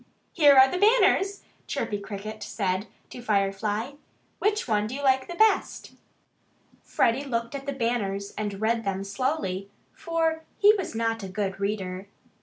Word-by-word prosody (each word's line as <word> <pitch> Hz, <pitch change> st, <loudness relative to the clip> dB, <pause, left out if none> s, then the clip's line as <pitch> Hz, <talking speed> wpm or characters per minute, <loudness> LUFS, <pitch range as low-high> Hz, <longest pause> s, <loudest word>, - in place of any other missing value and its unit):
"Here 290 Hz, -4 st, +6 dB
are 265 Hz, 0 st, +9 dB
the 360 Hz, -, -3 dB
banners!" 405 Hz, -2 st, +3 dB, 0.2 s
Chirpy 205 Hz, -, -2 dB
Cricket 210 Hz, +1 st, -7 dB
said 190 Hz, 0 st, -2 dB, 0.2 s
to 245 Hz, -, -8 dB
Freddie. 210 Hz, +4 st, -1 dB, 0.4 s
"Which 420 Hz, -4 st, 0 dB
one 210 Hz, -2 st, +1 dB
do 245 Hz, -, -6 dB
you 285 Hz, -, -5 dB
like 265 Hz, -1 st, +3 dB
best?" 435 Hz, -1 st, +2 dB, 0.9 s
Freddie 240 Hz, +4 st, +1 dB
looked 235 Hz, -3 st, -3 dB
at 275 Hz, 0 st, -6 dB
the -, -, 0 dB
banners 220 Hz, -6 st, -2 dB
and 205 Hz, -2 st, -4 dB
read 225 Hz, +1 st, 0 dB
them 195 Hz, -1 st, -2 dB
slowly, 200 Hz, -3 st, -2 dB, 0.2 s
for 325 Hz, -1 st, -1 dB, 0.2 s
he 415 Hz, +1 st, +6 dB
was 380 Hz, -, -4 dB
not 225 Hz, 0 st, -1 dB
a 195 Hz, -, -5 dB
good 195 Hz, 0 st, -3 dB
reader. 195 Hz, -2 st, -3 dB
225 Hz, 150 wpm, -26 LUFS, 200-280 Hz, 0.9 s, are